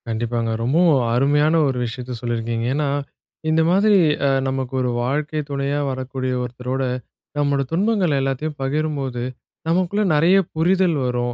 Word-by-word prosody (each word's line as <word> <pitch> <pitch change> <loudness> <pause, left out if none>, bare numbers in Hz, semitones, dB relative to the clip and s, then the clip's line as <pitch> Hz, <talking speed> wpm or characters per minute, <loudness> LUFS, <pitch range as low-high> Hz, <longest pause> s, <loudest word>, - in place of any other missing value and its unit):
கண்டிப்பாங்க. 115 0 -1
ரொம்பவும் 150 +2 +3
அருமையான 145 +5 +3
ஒரு 130 -2 -1
விஷயத்த 125 +2 -6
சொல்லிருக்கீங்க. 115 -1 -2
ஏன்னா, 145 +1 0 0.6
இந்த 160 +1 +3
மாதிரி 200 +2 +4 0.3
அ - - +3 0.2
நமக்கு 130 -1 -3
ஒரு 125 - 0
வாழ்க்கை 150 +4 -1
துணையா 140 +1 -1
வரக்கூடிய 130 0 -3
ஒருத்தரோட, 125 +2 -3 0.5
நம்மோட 145 -1 +1
துன்பங்கள் 185 -4 +1
எல்லாத்தையும் 135 +3 -2
பகிரும்போது, 135 -3 -2 0.4
நமக்குள்ள 185 +5 +1
நறைய 170 +6 +5 0.2
புரிதல் 175 0 +2
வரும். 120 -1 -1
140 Hz, 125 wpm, -21 LUFS, 125-155 Hz, 0.6 s, நறைய